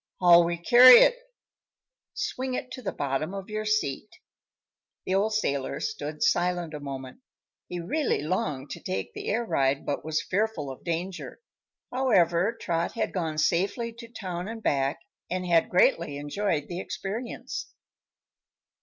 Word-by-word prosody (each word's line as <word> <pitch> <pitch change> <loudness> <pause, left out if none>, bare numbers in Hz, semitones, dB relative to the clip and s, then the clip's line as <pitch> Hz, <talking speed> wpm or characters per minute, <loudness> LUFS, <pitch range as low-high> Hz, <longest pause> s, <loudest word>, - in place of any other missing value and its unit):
"How'll 175 -1 +7
we 170 0 -1
carry 245 +8 +9
it?" - - +5 1.0
"Swing 260 0 -3
it 255 - -5
to 255 - -7
the 220 - -3
bottom 145 +6 -2
of 195 +1 -7
your 215 0 -3
seat." 215 -4 -1 1.0
The 185 - -1
old 200 +3 +2
sailor 140 -10 -1
stood 150 +1 -4
silent 175 -2 +1
a 150 - -5
moment. 135 - -7 0.5
He 175 - -5
really 250 - -1
longed 150 -5 -2
to - - -6
take 95 +1 -4
the - - -7
air 235 +3 0
ride 135 -7 +1
but 145 - -2
was 155 0 -1
fearful 195 -8 -1
of 130 - -11
danger. 175 +2 -4 0.5
However, 190 -7 +3
Trot 170 -1 -1
had - - -2
gone 160 -4 -2
safely 200 +9 0
to 235 0 -11
town 185 -6 -6
and 225 0 -7
back 135 -1 0 0.3
and 185 0 -2
had 170 -2 +3
greatly 170 -4 +2
enjoyed 145 +1 -2
the 175 0 -5
experience. 215 +6 -5
175 Hz, 150 wpm, -27 LUFS, 150-215 Hz, 1.0 s, carry